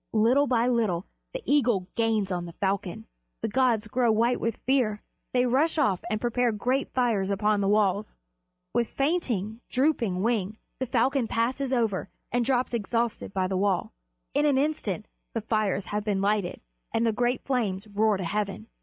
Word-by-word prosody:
Little 240 +6 +4
by 240 -1 +2
little 220 -7 +1 0.3
the - - -6
eagle 240 -10 +2
gains 220 -4 +1
on 175 -1 -2
the 170 - -9
falcon. 195 +1 -2 0.4
The - - +1
gods 235 -3 +2
grow 240 +1 +2
white 230 +3 +2
with 230 -1 -1
fear; 240 -6 +1 0.3
they 250 0 +3
rush 280 +7 +2
off 210 - +2
and 215 - 0
prepare 240 +1 +1
great 250 +6 -1
fires 225 -7 +1
upon 210 +1 +1
the 195 - +1
walls. 205 0 +1 0.6
With 235 -1 +2
fainting, 240 - -1
drooping 245 -9 +1
wing 215 -3 0 0.2
the 260 - -2
falcon 255 +1 +2
passes 255 +4 -1
over 220 -7 0 0.2
and 245 +1 +2
drops 250 0 +1
exhausted 230 0 -1
by 190 -1 0
the 190 0 -1
wall. 190 - 0 0.4
In 295 +2 +3
an 280 -2 +3
instant 265 - -1 0.3
the 225 - 0
fires 215 -3 0
have 210 0 0
been 205 -2 0
lighted, 200 -2 0 0.3
and 230 - +1
the 225 - +3
great 245 +2 0
flames 220 -6 -1
roar 210 0 +2
to 185 - -4
heaven. 210 +4 -3
225 Hz, 170 wpm, -27 LUFS, 205-250 Hz, 0.6 s, Little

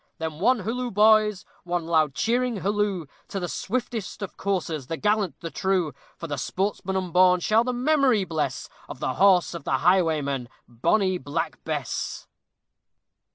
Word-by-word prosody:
Then 160 -1 -5
one 245 +4 +3
halloo, 245 +5 -2
boys, 210 -1 +4 0.2
one 175 -1 -2
loud 155 -4 +2
cheering 240 -2 0
halloo! 200 -3 0 0.2
To 195 - -4
the 175 - -3
swiftest 220 +1 -4
of 195 - -6
coursers, 165 -8 -2
the 165 - -3
gallant, 210 -2 0
the 165 -1 -5
true! 185 -5 0 0.2
For - - -7
the 145 -4 -4
sportsman 190 +3 -2
unborn 180 0 +4
shall 215 +6 +3
the 250 - -1
memory 255 -4 +2
bless 155 -7 -3 0.2
Of - - -8
the - - -1
horse 190 -3 +4
of 170 - -7
the 135 - +1
highwayman, 155 -7 +1 0.2
bonny 185 - +1
Black 145 +4 -4
Bess! 150 -6 -3
185 Hz, 155 wpm, -25 LUFS, 160-210 Hz, 0.2 s, boys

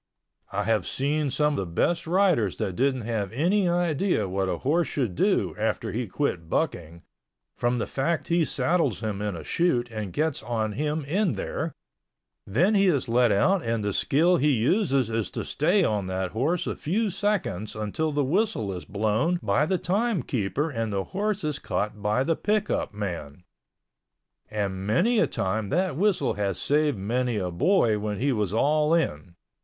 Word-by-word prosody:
I 105 - -1
have 110 -3 +1
seen 145 +2 0
some 150 +2 +1
the - - 0
best 160 - 0
riders 175 - +2
that 95 - -2
didn't 130 +2 +1
have 105 -4 -2
any 180 - +2
idea 175 - +1
what 95 0 -1
a 90 - -1
horse 160 - +1
should 125 -10 -1
do - - +1
after - - -1
he 120 +1 -3
quit 90 - -2
bucking, 85 - -2 0.5
from 120 +1 0
the 115 - -1
fact 155 +5 -1
he 170 0 +3
saddles 155 - 0
him 105 -2 -3
in 105 -3 -2
a 80 - -7
chute 125 - 0
and 105 -4 -4
gets 155 - -1
on 110 -1 -2
him 150 +5 -2
in 185 +5 +1
there—then - - -3
he 200 -1 +4
is 140 -8 +1
let 120 0 +3
out 180 - +3
and 115 -4 -1
the 100 -1 -1
skill 170 - +3
he 150 0 +2
uses 135 - +2
is 110 -1 -1
to - - -5
stay 180 +7 +2
on 105 - 0
that 95 -1 -2
horse 150 +10 0
a - - -2
few 205 +6 -1
seconds 190 - -1
until 110 +9 -2
the 145 0 +1
whistle 150 - 0
is 90 - -7
blown 110 - 0
by 110 +9 +2
the 185 - +1
time 200 - 0
keeper 130 +8 -1
and 115 -4 -2
the 100 -1 -1
horse 210 +1 -1
is 150 -2 -2
caught 105 0 -3
by 105 +5 +1
the 165 +4 +1
pick 210 +3 0
up - - -1
man—and 90 -6 -6 1.4
many 210 - +3
a - - +3
time 100 +2 -2
that 180 -2 0
whistle 200 +4 +1
has 100 -3 -2
saved 150 -3 +1
many 120 +4 -1
a 90 -3 -2
boy 110 - +2
when 105 0 -3
he 135 +5 +1
was 105 -6 0
all 150 +7 +3
in. 85 - -2
130 Hz, 180 wpm, -26 LUFS, 105-170 Hz, 1.4 s, he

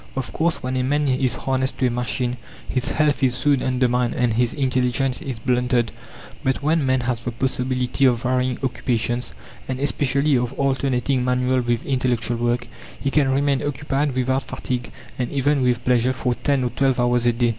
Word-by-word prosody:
Of 135 -1 -3
course, 165 -3 0
when 130 +1 -2
a - - +1
man 145 +3 +1
is 130 -2 +1
harnessed 130 0 -1
to 130 - +1
a 125 - +2
machine, 125 +1 -2 0.3
his 130 - -1
health 150 -2 +1
is 130 -2 +2
soon 140 0 +2
undermined 125 -1 +1
and 120 -2 +1
his 120 +1 +2
intelligence 130 -1 0
is 130 -4 -5
blunted; 125 0 +1 0.5
but 135 +1 0
when 155 +1 +2
man 130 -1 +2
has 120 -1 -2
the 120 - -2
possibility 125 +1 0
of 120 -2 +3
varying 125 0 +1
occupations, 120 -2 -1 0.3
and 130 -1 -3
especially 140 0 +1
of 125 +1 -2
alternating 135 -1 0
manual 125 0 +1
with 120 -1 -1
intellectual 125 -3 0
work, 120 +1 0 0.3
he 135 - -1
can 140 -2 +3
remain 140 0 +1
occupied 145 -1 -1
without 130 +1 +1
fatigue, 125 -2 -4 0.3
and 125 - -1
even 140 0 +1
with 125 -2 +1
pleasure, 125 0 +3
for 125 -1 -1
10 140 +1 0
or 125 - 0
12 135 +1 +1
hours 120 0 +2
a 120 - +4
day. 120 0 +1
130 Hz, 185 wpm, -22 LUFS, 125-135 Hz, 0.5 s, a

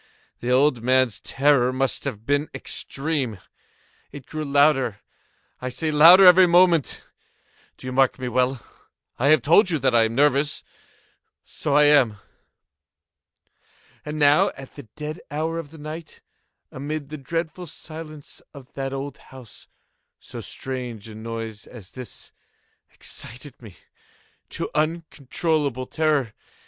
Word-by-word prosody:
The 120 - -4
old 130 -1 +3
man's 130 -1 +2
terror 135 -3 +2
must 135 +2 -1
have 115 -6 -5
been 145 +3 0
extreme! 135 -6 -3 0.7
It 140 -3 -10
grew 155 -1 -5
louder, 140 -6 +2 0.6
I 130 - -3
say, 155 +5 -2
louder 170 +6 +8
every 180 0 +8
moment!—do 170 -6 -1
you 130 - -4
mark 135 0 +2
me 130 - -5
well? 125 0 0 0.5
I 130 - +2
have 150 -4 +5
told 180 - +5
you 165 - +1
that 130 -2 +1
I 115 -1 +5
am 115 +1 -4
nervous: 145 +1 +2 0.8
so 145 -2 -3
I 150 - +6
am. 140 -8 +4 1.9
And 150 +1 -6
now 145 0 +4
at 135 -1 -11
the 145 -5 -12
dead 150 +2 -6
hour 160 +3 -2
of 155 -3 -8
the 160 - -14
night, 155 +2 -9 0.5
amid 145 +2 -5
the 155 - -6
dreadful 165 +4 -4
silence 155 -1 -10
of 135 -2 -13
that 135 0 -4
old 135 0 -6
house, 130 -5 -15 0.5
so - - -9
strange 125 -5 -6
a 110 - -10
noise 110 -1 -7
as 105 -7 -13
this 125 -2 -9 0.6
excited 130 +3 -6
me 105 -7 -13 0.7
to - - -4
uncontrollable 155 -3 -1
terror. 150 -6 0
140 Hz, 135 wpm, -23 LUFS, 125-155 Hz, 1.9 s, louder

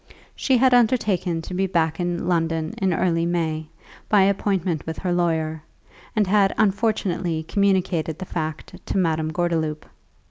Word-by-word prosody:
She 265 -2 +2
had 255 +1 +4
undertaken 210 -9 +2
to 180 - -7
be 190 +1 0
back 165 -2 0
in 175 0 -2
London 165 -2 0 0.2
early 165 0 +1
in 170 +1 0
May, 160 -2 -1 0.4
by 205 -3 +5
appointment 190 -4 0
with 160 -2 -4
her 180 +4 -1
lawyer, 160 -3 0 0.5
and 215 -2 +3
had 195 0 +3
unfortunately 190 -6 0
communicated 185 -4 0
the 185 - -6
fact 160 +2 -5
to - - -1
Madame 160 -3 0
Gordeloup. 160 -3 -1
175 Hz, 145 wpm, -23 LUFS, 160-195 Hz, 0.5 s, by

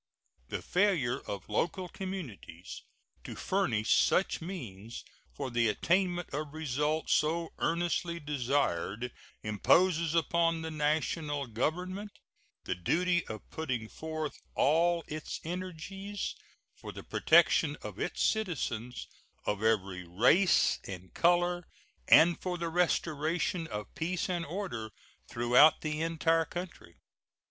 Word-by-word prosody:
The - - -4
failure 175 -11 +2
of 100 -1 -5
local 175 - -1
communities 165 - -7 0.4
to - - -7
furnish 120 - +1
such 190 - +2
means 120 - -7 0.3
for 120 - -5
the 120 -1 +2
attainment 175 - +1
of 150 +1 -4
results 150 +1 0
so 165 +2 +1
earnestly 170 0 0
desired 130 - -1 0.3
imposes 165 - +3
upon 165 0 +2
the 160 - -4
National 150 -1 0
Government 180 - -2 0.5
the - - -1
duty 175 - +1
of 110 -1 -7
putting 130 -8 -3
forth 155 +2 -5
all 170 +3 +3
its 155 0 -5
energies 185 +3 -5 0.4
for - - -8
the - - -9
protection - - +4
of - - -7
its - - -1
citizens 130 - -1 0.4
of 105 0 -1
every 100 -5 +1
race 125 - +4
and 95 -1 -8
color 175 0 +2 0.4
and 170 +2 +6
for 180 -1 -2
the 170 -1 -2
restoration 165 0 0
of 105 -5 -6
peace 180 +3 -2
and 175 -2 -2
order 160 - -4 0.4
throughout 125 +6 +5
the 155 0 -2
entire 165 0 +2
country. 175 - -8
160 Hz, 115 wpm, -31 LUFS, 120-175 Hz, 0.5 s, and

